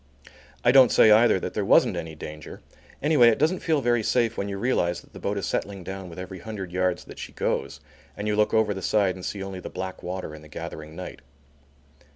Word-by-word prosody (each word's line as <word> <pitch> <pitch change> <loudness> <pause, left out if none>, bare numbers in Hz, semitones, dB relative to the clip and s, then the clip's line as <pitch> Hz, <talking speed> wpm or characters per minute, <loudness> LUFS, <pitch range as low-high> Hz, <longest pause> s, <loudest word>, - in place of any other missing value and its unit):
I 120 - +7
don't 130 -2 +7
say 110 - +6
either 110 -2 +5
that - - -5
there - - -1
wasn't - - +4
any 80 -1 -5
danger; 75 -1 -9 0.4
anyway, 150 -5 +5
it 115 - +4
doesn't 160 +5 +1
feel 155 -4 +1
very 120 -2 +2
safe 115 +1 +1
when 100 - -3
you 100 - -4
realize 95 -6 0
that - - -23
the - - -10
boat 100 +1 -2
is 100 - -2
settling 100 0 -3
down 95 0 -7
with 85 - -11
every 95 0 -7
hundred 95 -2 -7
yards 90 0 0
that - - -12
she - - -8
goes, - - -2 0.4
and 105 +1 -4
you 105 - +1
look 105 0 +2
over 110 -2 +2
the 95 - -6
side 100 0 +2
and 90 - -10
see 100 +1 -4
only 95 -1 -6
the - - -7
black 95 0 -6
water 90 -3 -5
in 75 - -10
the 75 - -14
gathering 80 0 -8
night. 90 +1 -8
95 Hz, 230 wpm, -25 LUFS, 90-110 Hz, 0.4 s, I